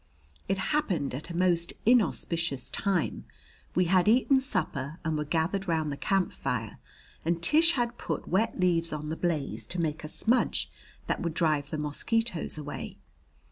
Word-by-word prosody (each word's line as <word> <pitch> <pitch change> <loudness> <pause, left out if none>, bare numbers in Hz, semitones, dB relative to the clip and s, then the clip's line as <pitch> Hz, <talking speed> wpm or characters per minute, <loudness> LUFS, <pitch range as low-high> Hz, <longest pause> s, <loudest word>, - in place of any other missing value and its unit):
It 195 - 0 0.2
happened 190 - 0
at 140 +6 -6
a 170 - -4
most 175 -2 +2
inauspicious 170 - +2
time. 195 -6 -1 0.5
We 180 - +3
had 180 +1 +3
eaten 260 +4 +5
supper 160 - -3
and 160 -1 0
were 150 - -1
gathered 165 +6 -1
round 160 -3 0
the - - -3
camp 195 +5 0
fire 120 -5 -3 0.4
and 170 +1 0
Tish 315 - +6
had 240 -2 -1
put - - -4
wet 195 +6 +1
leaves 170 -2 +2
on 150 0 -4
the 160 - -2
blaze 165 -5 -2
to 180 - -3
make 160 -1 -2
a - - -4
smudge 230 +10 +1 0.3
that - - -2
would 170 -3 -2
drive 155 -4 +1
the 155 - -3
mosquitoes 170 +6 -1
away. 145 -1 -6
170 Hz, 165 wpm, -28 LUFS, 155-195 Hz, 0.5 s, Tish